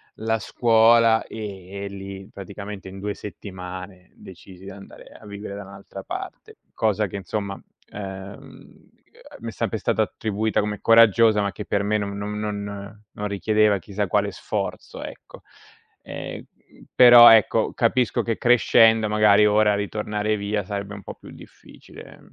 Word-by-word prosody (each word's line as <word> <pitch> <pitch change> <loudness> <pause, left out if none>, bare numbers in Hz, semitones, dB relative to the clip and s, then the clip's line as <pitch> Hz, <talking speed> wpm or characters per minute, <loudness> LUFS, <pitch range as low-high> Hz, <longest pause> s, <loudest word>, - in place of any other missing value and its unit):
la 110 +1 -1
scuola 115 +1 +4
e 100 -2 -7
lì 95 0 -9
praticamente 100 0 -9
in 95 +1 -10
2 100 +1 -3
settimane 95 -2 -9
decisi 95 0 -14
di - - -8
andare 100 0 -13
a - - -16
vivere 100 0 -8
da 100 - -7
un'altra 100 0 -11
parte. - - -8 0.2
Cosa 105 -1 0
che, 100 - -10
insomma, 100 +1 -5 0.3
ehm, 95 0 -11 0.5
mi - - -5
è - - -7
sempre - - -3
stata - - 0
attribuita 110 0 -2
come 105 0 -3
coraggiosa, 115 -1 +5
ma 100 -1 -1
che 105 - -8
per 100 +4 -1
me 105 +1 0
non 100 0 -4
non 105 +1 -5
non 105 0 -6
non 105 0 -5
richiedeva 105 0 +2
chissà 100 +3 -4
quale 100 0 0
sforzo, - - -5
ecco. - - -11 0.6
Ehm, - - -7 0.5
però 120 -1 +9
ecco, 110 -3 +3
capisco 125 -3 +1
che 115 -2 -2
crescendo 115 -2 +4
magari 105 0 +4
ora 105 0 +3
ritornare 105 +1 -2
via 100 0 -2
sarebbe 100 +1 -6
un 100 - -11
po' - - -8
più - - -15
difficile. - - -15
105 Hz, 150 wpm, -23 LUFS, 100-110 Hz, 0.6 s, però